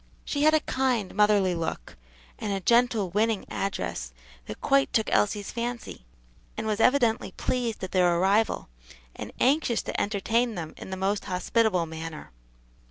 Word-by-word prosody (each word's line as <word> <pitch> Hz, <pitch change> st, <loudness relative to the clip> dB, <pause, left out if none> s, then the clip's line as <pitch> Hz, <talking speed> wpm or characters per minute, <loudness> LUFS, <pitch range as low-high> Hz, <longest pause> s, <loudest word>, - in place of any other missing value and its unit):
She 285 Hz, -, -2 dB
had 310 Hz, +1 st, +5 dB
a 310 Hz, -, +3 dB
kind, 255 Hz, -9 st, -1 dB
motherly 205 Hz, -2 st, +3 dB
look, 165 Hz, -, -4 dB, 0.4 s
and 210 Hz, -, -3 dB
a 195 Hz, -, -1 dB
gentle, 235 Hz, -2 st, +2 dB
winning 215 Hz, +1 st, +1 dB
address 130 Hz, -, -3 dB, 0.4 s
that -, -, -7 dB
quite 275 Hz, 0 st, +2 dB
took 220 Hz, -, +1 dB
Elsie's 205 Hz, -1 st, +1 dB
fancy; 235 Hz, -, -5 dB, 0.5 s
and 220 Hz, -, -3 dB
was 215 Hz, -1 st, -1 dB
evidently 240 Hz, -2 st, +2 dB
pleased 240 Hz, -5 st, -2 dB
at 190 Hz, -, -4 dB
their 175 Hz, -2 st, +3 dB
arrival, 200 Hz, +5 st, +2 dB, 0.5 s
and -, -, -7 dB
anxious 260 Hz, -3 st, +2 dB
to -, -, -2 dB
entertain 225 Hz, +3 st, 0 dB
them 160 Hz, -3 st, -6 dB
in -, -, -10 dB
the 190 Hz, -, -4 dB
most 195 Hz, +2 st, -1 dB
hospitable 185 Hz, 0 st, +1 dB
manner. 160 Hz, -1 st, -8 dB
210 Hz, 155 wpm, -27 LUFS, 185-235 Hz, 0.5 s, had